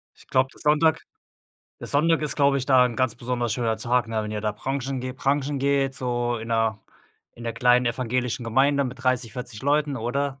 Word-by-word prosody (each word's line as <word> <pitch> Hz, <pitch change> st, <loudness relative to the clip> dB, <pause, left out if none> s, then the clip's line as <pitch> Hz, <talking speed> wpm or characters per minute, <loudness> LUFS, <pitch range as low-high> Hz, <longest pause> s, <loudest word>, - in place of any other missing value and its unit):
Ich -, -, -20 dB
glaub, 130 Hz, 0 st, +2 dB
der -, -, -19 dB
Sonntag 155 Hz, +1 st, +3 dB, 0.8 s
der -, -, -8 dB
Sonntag 160 Hz, +3 st, +2 dB
ist, 150 Hz, -, -2 dB
glaub 140 Hz, -1 st, +4 dB
ich, 135 Hz, -2 st, 0 dB
da 130 Hz, -2 st, +5 dB
'n 120 Hz, -, -6 dB
ganz 130 Hz, -3 st, +1 dB
besonders 120 Hz, -1 st, -2 dB
schöner 115 Hz, -2 st, 0 dB
Tag, 120 Hz, +1 st, 0 dB
ne? 110 Hz, -1 st, -1 dB
Wenn 105 Hz, -, -5 dB
ihr 105 Hz, -1 st, -3 dB
da 105 Hz, -1 st, -1 dB
brunchen 135 Hz, +3 st, -3 dB
geht 130 Hz, +1 st, -5 dB
brunchen 140 Hz, +1 st, 0 dB
geht, 135 Hz, 0 st, +1 dB
so 120 Hz, -2 st, -1 dB
in 115 Hz, +1 st, -7 dB
der 115 Hz, -1 st, +1 dB, 0.5 s
in 120 Hz, -, -11 dB
der 115 Hz, -, -2 dB
kleinen 125 Hz, +1 st, +3 dB
evangelischen 125 Hz, +1 st, -1 dB
Gemeinde 140 Hz, +5 st, +2 dB
mit 130 Hz, 0 st, -6 dB
30, 125 Hz, -3 st, 0 dB
40 125 Hz, -3 st, -6 dB
Leuten 145 Hz, 0 st, +1 dB
oder? 135 Hz, +4 st, -2 dB
125 Hz, 210 wpm, -24 LUFS, 120-140 Hz, 0.8 s, da